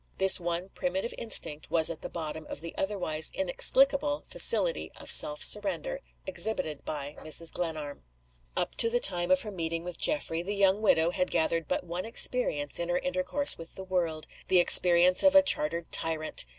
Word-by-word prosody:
This 190 0 +4
one 175 +2 -5
primitive 190 +5 -5
instinct 155 -9 0
was 160 0 +3
at 165 - -10
the - - -8
bottom 160 -2 -7
of - - -8
the 165 0 -8
otherwise 180 -6 -1
inexplicable 275 +10 +2
facility - - +2
of - - -4
self 150 0 +5
surrender 355 - +1 0.3
exhibited 155 -10 -3
by 145 -1 -7
Mrs. 160 +1 -2
Glenarm. 155 -4 -6 0.6
Up - - -2
to 230 - +5
the 245 +1 0
time 175 -5 +2
of 280 -1 +1
her 210 - -8
meeting 165 -2 -5
with 180 -1 -9
Geoffrey, 170 - 0
the 200 +4 -5
young 200 +1 +1
widow 170 -5 +1
had 180 0 -3
gathered 165 0 -2
but - - -3
one 175 +1 -7
experience 225 - +2
in 170 0 -4
her 175 - -1
intercourse 275 +3 -1
with 165 0 -8
the 190 - -7
world 170 -4 -4 0.2
the 185 - +2
experience 175 0 +4
of 290 0 +3
a 285 - +6
chartered 170 - +2
tyrant. 155 - 0
175 Hz, 175 wpm, -27 LUFS, 160-210 Hz, 0.6 s, a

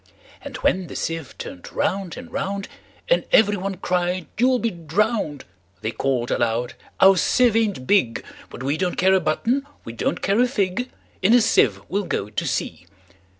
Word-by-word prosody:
And 275 -3 -7
when 185 -7 +1
the - - -9
sieve 165 -4 -4
turn'd 90 - -8
round 190 -3 -2
and 250 -1 -10
round, 195 0 -3 0.4
And - - +3
every 205 -1 +5
one 195 0 -3
cried, 180 -1 -1
"You 250 +2 +5
'll - - +3
be 230 -2 -1
drown'd!"They 145 - -3
call'd 125 -1 -1
aloud, 120 +1 0 0.3
"Our 195 0 +7
sieve 240 +5 +3
ain't 210 - 0
big:But 130 - -1
we 140 +3 0
don't 180 0 -1
care 190 +1 +4
a 190 - +5
button; 235 - 0 0.2
we 115 - -7
don't 115 - -2
care 200 +3 +2
a 250 - +4
fig:In 210 -1 -1
a - - +7
sieve 105 - +3
we 195 - -1
'll 205 - -3
go 100 - -2
to - - -2
sea!" 85 - -3
185 Hz, 175 wpm, -22 LUFS, 135-215 Hz, 0.4 s, Our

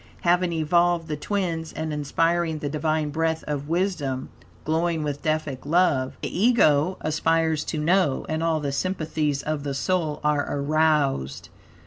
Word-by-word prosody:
Having 175 0 +2
evolved 170 +1 +2
the 155 - -2
twins, 165 -1 -2
and 155 0 -4
inspiring 165 +3 0
the 150 -1 -3
Divine 155 0 -1
breath 160 +1 -1
of 145 0 -4
wisdom; 165 -7 -1 0.4
glowing 160 0 0
with 145 -1 -3
Deific 155 -4 -2
love, 150 -5 +1
the - - -3
Ego 185 -7 +4
aspires 160 0 +1
to 160 - -3
know; 155 -2 +2
and 155 0 -2
all 165 -1 +1
the 145 -2 -2
sympathies 155 -3 -1
of 155 -1 -2
the 140 -1 -3
soul 160 0 -1
are 150 -1 +1
aroused. 145 - 0
155 Hz, 145 wpm, -24 LUFS, 145-170 Hz, 0.4 s, Ego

